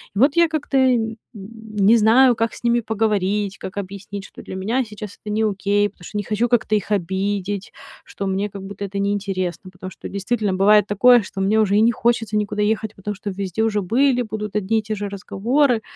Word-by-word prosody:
И - - -1
вот 280 +4 +4
я 340 -1 +6
как-то 300 -3 -2
и 260 -1 +4
н 225 0 -3 0.2
не 215 +1 +1
знаю, 240 +3 +5
как 225 0 -1
с - - -12
ними 240 0 +3
поговорить, 210 -2 -1
как 195 +2 -8
объяснить, 200 +1 -6
что - - -12
для 185 - -8
меня 225 +8 0
сейчас 210 -1 -9
это 210 - -7
не 220 +1 +1
окей, 205 0 +1
потому 175 - -20
что 210 - -6
не 205 - -1
хочу 215 +4 0
как-то 235 -3 +1
их 205 -1 -2
обидеть, 195 +1 -2 0.3
что 200 - -6
мне 195 +2 -1
как 195 -1 -9
будто 200 0 -6
это 200 +1 -6
неинтересно. 195 -2 -2
Потому 185 0 -9
что - - -9
действительно 200 0 -1
бывает 205 +2 +4
такое, 240 +4 +5
что 195 0 -6
мне 210 +3 +2
уже 205 -2 +2
и - - +5
не 235 +1 +5
хочется 225 -2 0
никуда 210 0 -1
ехать, 220 0 -1
потому 205 +2 -5
что 205 +1 -6
везде 195 +1 -3
уже 210 -2 +1
были, 250 +5 +2
будут 210 -2 -6
одни 210 +2 +1
и - - -2
те 215 0 -4
же 205 0 -4
разговоры. 230 +6 0
210 Hz, 220 wpm, -21 LUFS, 195-225 Hz, 0.3 s, я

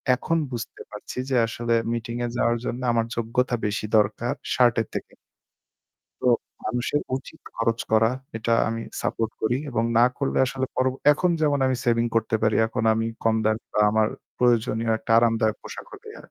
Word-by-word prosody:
এখন 165 +6 -1
বুঝতে 120 -1 -6
পারছি 105 +3 -9
যে 130 - +1
আসলে 115 +1 -2 0.2
মিটিং 115 0 -4
এ - - -1
যাওয়ার 120 -1 +2
জন্য 125 +2 -3
আমার 115 -1 +1
যোগ্যতা 120 +2 0
বেশি 105 +1 -1
দরকার 110 +3 +1 0.2
শার্টের 120 -3 +3
থেকে। - - -5 1.1
তো - - -1 0.4
মানুষের 125 +6 -1 0.2
উচিত 135 +4 -11 0.2
খরচ 115 0 0
করা। 110 +1 +5 0.3
এটা 115 +1 -1 0.2
আমি 115 0 -3 0.2
সাপোর্ট 115 -1 -1
করি 115 +3 +2
এবং 115 -2 0
না 120 - +7
করলে 140 - 0
আসলে 130 0 -2
পর 130 - +1 0.3
এখন 180 +4 +1
যেমন 145 -2 +2
আমি 130 0 +1
সেভিং 120 0 +2
করতে 110 0 +1
পারি, 110 -1 +3
এখন 110 - -3
আমি 115 +1 -1 0.2
কম 110 0 +3
দামি 110 +1 0
বা - - +2
আমার 110 0 +2 0.3
প্রয়োজনীয় 115 -2 +2
একটা 115 - -2
আরামদায়ক 115 -2 +2
পোশাক - - -8
হলেই - - -11
হয়। - - -15
115 Hz, 175 wpm, -24 LUFS, 110-125 Hz, 1.1 s, না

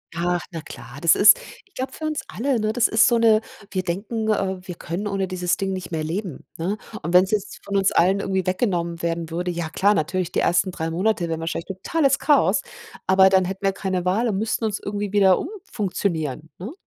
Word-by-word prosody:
Ach, 175 -1 -1
na 165 -2 -5
klar, 140 -2 -11
das 170 - +5
ist 205 +1 +7 0.3
ich 395 - -31
glaube, 260 +1 -3
für 315 - -6
uns 310 -1 -2
alle 260 +1 -1
ne, 215 0 0
das 240 -1 +3
ist 220 +1 +4
so 240 - +3
'ne 225 -2 +4 0.3
wir 185 - -1
denken, 210 +5 -3
äh, 190 -3 0
wir 180 - -5
können 180 +5 -4
ohne 195 -1 -1
dieses 180 -1 -1
Ding 195 -1 -2
nicht 185 -1 -6
mehr 160 -2 -2
leben, 170 -1 -4
ne? 185 +6 -2 0.2
Und 170 +3 -4
wenn's 185 +1 +5
jetzt 210 -2 -2
von 200 - -1
uns 195 0 +3
allen 190 +3 +3
irgendwie 190 -2 -1
weggenommen 175 -4 -1
werden 170 -1 -2
würde, 175 +2 -2
ja 170 -2 -3
klar, 200 +5 +3
natürlich, 180 +1 -1
die - - 0
ersten 180 +2 +2
3 165 -2 -4
Monate 180 0 0
wären 160 -1 -2
wahrscheinlich 165 +1 -3
totales 275 - 0
Chaos, 295 -2 +3 0.5
aber 190 0 +6
dann 190 -1 +3
hätten 190 +2 -5
wir 195 - +4
keine 190 -2 -3
Wahl 205 +7 +1
und 200 - -1
müssten 220 +2 -1
uns 210 -2 -2
irgendwie 205 0 -4
wieder 195 -3 +5
umfunktionieren, 190 - -3
ne? 210 - -6
190 Hz, 215 wpm, -23 LUFS, 175-210 Hz, 0.5 s, ist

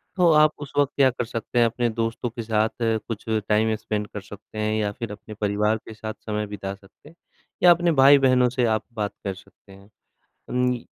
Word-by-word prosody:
तो 175 -3 +4
आप 150 0 +6
उस 140 - -7
वक़्त 145 -1 +3
क्या 135 -2 +5
कर 125 -1 -3
सकते 115 +1 -3
हैं 120 - +6
अपने 120 +1 0
दोस्तों 115 +1 -2
के 115 0 -6
साथ 110 0 +1
कुछ 110 -1 -2 0.2
टाइम 110 +1 +3
स्पेंड 105 -1 -3
कर 105 - -7
सकते 105 +1 -13
हैं 110 0 0
या 105 -1 0
फिर 115 0 -6
अपने 105 +1 -10
परिवार 105 +1 0
के 110 - -9
साथ 110 0 -6
समय 105 -1 -2
बिता 100 -1 -5
सकते 100 +9 -19
हैं 165 - -20 0.5
या 175 - +9
अपने 170 0 +3
भाई-बहनों 130 -3 +6
से 125 0 0
आप 110 -2 +1
बात 105 -2 -3
कर 100 -1 -2
सकते 100 +1 -18
हैं। 100 +1 -16 0.6
अम, 125 0 +1
110 Hz, 210 wpm, -24 LUFS, 105-125 Hz, 0.6 s, या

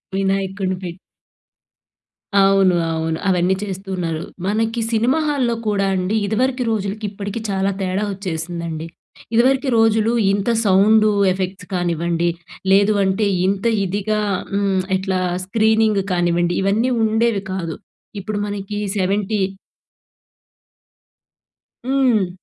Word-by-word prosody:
వినాయకుడిని 195 -1 -1
పె 180 - -3 1.5
అవును. 195 -2 +5 0.2
అవును. 160 0 -1
అవన్నీ 185 0 +2
చేస్తూ 195 -1 -6
ఉన్నారు. 165 -2 -2 0.2
మనకి 225 +3 0
సినిమా 235 +7 +2
హాల్‌లో 255 -5 +1
కూడా 200 -2 +1
అండి 185 +3 -1
ఇదివరకి 250 +5 0
రోజులకి, 210 0 -2
ఇప్పటికి 200 +2 -5
చాలా 195 0 0
తేడా 190 +2 -1
వచ్చేసిందండి. 170 -3 -4 0.5
ఇదివరకి 265 +3 +3
రోజులు 225 0 +3 0.2
ఇంత 200 +3 -1 0.2
సౌండ్ 210 +3 +5 0.2
ఎఫెక్ట్స్ 185 0 -4
కానివ్వండి 170 -1 0 0.4
లేదు 200 +2 +5
అంటే 190 +3 +1 0.2
ఇంత 195 +2 -1 0.2
ఇదిగా 205 +3 -1 0.3
హ్మ్. 200 -2 +1
ఎట్లా 190 -1 -1 0.3
స్క్రీనింగ్ 220 0 +2
కానివ్వండి 175 -1 +1
ఇవన్నీ 220 +6 +1
ఉండేవి 220 -1 +1
కాదు. 170 -4 -3 0.4
ఇప్పుడు 205 +1 -4
మనకి 205 0 -5 0.2
సెవెంటీ 200 +2 0 2.5
హ్మ్. 255 -8 +2
195 Hz, 105 wpm, -20 LUFS, 185-215 Hz, 2.5 s, అవును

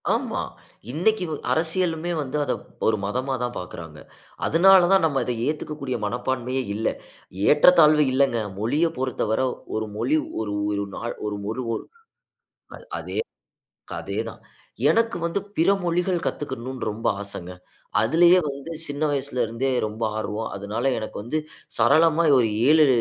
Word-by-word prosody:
ஆமா. - - -1 0.5
இன்னைக்கு 185 +8 +1 0.3
அரசியலுமே 165 0 0
வந்து 145 0 -2
அதை - - 0 0.3
ஒரு 110 -1 +3
மதமா 130 +6 -2
தான் 120 0 -3
பார்க்கறாங்க. 85 -3 -8 0.5
அதனால 185 +2 +6
தான் 195 -3 +5
நம்ம 140 -4 +1
அத 125 - -1
ஏத்துக்கக்கூடிய 150 -4 -3
மனப்பான்மையே 125 +3 -2
இல்ல. 110 +1 -1 0.6
ஏற்றத்தாழ்வு 150 -1 +6
இல்லங்க. 135 -2 +3 0.2
மொழிய 140 +10 +1
பொறுத்தவர 125 -3 -1 0.3
ஒரு 110 0 -2
மொழி 130 +8 +2 0.2
ஒரு 105 -2 -3 0.2
ஒரு 100 0 -1
நாள் 120 - -4
ஒரு 105 - -2 1.6
அதே, - - -6 0.8
அதே - - -5
தான். - - -14 0.5
எனக்கு 230 -2 +2
வந்து 170 +4 -1 0.2
பிற 165 +3 +3 0.2
மொழிகள் 175 0 0
கத்துக்கர்ணும்னு 130 -3 -4
ரொம்ப 110 +2 -5
ஆசைங்க. 90 -3 -5 0.5
அதுலயே 170 +9 +5
வந்து 140 +4 -7
சின்ன 145 0 -4
வயசுல 135 -3 -1
இருந்தே 115 +4 -1 0.2
ரொம்ப 110 +2 -7 0.2
ஆர்வம். 110 +1 -3
அதனால 100 +2 -4 0.2
எனக்கு 110 - -6
வந்து 140 +8 -2 0.4
சரளமா 160 +8 +4
ஒரு 115 -2 +1 0.2
7 155 0 +6
135 Hz, 130 wpm, -24 LUFS, 110-160 Hz, 1.6 s, அதனால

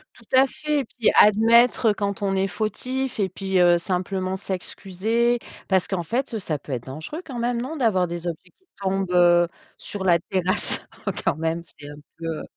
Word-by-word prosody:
Tout - - -16
à 265 +1 +6
fait 300 +2 -2
et 270 - -2
puis 225 0 +1
admettre, 230 +3 +5
heu, - - +3
quand 200 +1 -3
on 195 -1 0
est 195 - +1
fautif 250 +6 -3
et 200 - +2
puis, 190 0 -1
heu, 175 -1 +6
simplement 185 +1 -2
s'excuser, 210 +5 -1 0.3
parce 190 -2 +2
qu'en 185 -3 -1
fait, 240 +3 -2
ça 160 -6 -2
peut 140 - -11
être 125 -2 -3
dangereux 155 - -6
quand 260 -4 -7
même, 235 0 -1
non, 270 +6 -5
d'avoir 215 - +2
des 170 0 -6
objets 175 +1 -6
qui 375 - -37 0.2
tombent, 195 -1 -1
heu, 175 -1 +5 0.3
sur 200 -2 -6
la 170 -2 +5
terrasse, 185 +1 -1 0.2
oh, - - +1
quand - - +2
même 165 +2 -2
c'est 145 0 -10
un 145 - -9 0.2
peu, 165 - -8
heu 160 -1 -3
195 Hz, 200 wpm, -24 LUFS, 175-235 Hz, 0.3 s, à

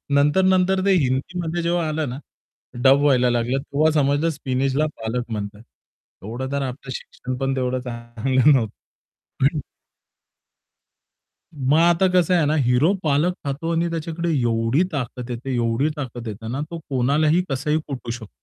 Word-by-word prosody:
नंतर-नंतर 185 +5 +3
ते 200 - +4
हिंदीमध्ये 165 +6 -2
जेव्हा 170 -1 0
आलं 155 -2 -2
ना 125 +3 -6 0.6
डब 135 +1 +6
व्हायला 130 -4 +4
लागलं, 120 +2 0
तेव्हा 145 +3 +1
समजलं 145 +1 +2
स्पिनचला 135 0 0
पालक 115 +1 -4
म्हणतात. 105 -1 -5 0.6
एवढं 120 +6 -5
तर 140 0 -1
आपलं 130 0 -5
शिक्षण 130 0 -6
पण 135 +1 -1
तेवढं 130 -1 -1
चांगलं 125 +3 +1
नव्हतं. 115 -5 0 0.7
पण 150 +2 +2 1.9
मग 140 +2 +2
आता 175 +2 +4
कसं 180 -1 +3
आहे 170 -3 +3
ना, 150 - +2
हिरो 135 +4 +3
पालक 150 +4 +2
खातो 145 +4 -2
आणि 170 +1 +1
त्याच्याकडे 165 +1 -3
एवढी 115 +5 +2
ताकत 125 -3 -4
येते, 125 +2 -4
एवढी 120 +4 +1
ताकत 125 -5 -6
येते 110 +1 -7
ना 135 - -2
तो 170 - -5
कोणालाही 150 +6 +2
कसाही 150 +3 0
कुटू 130 -4 -6
शकतो. 115 -3 -6
135 Hz, 145 wpm, -22 LUFS, 125-160 Hz, 1.9 s, डब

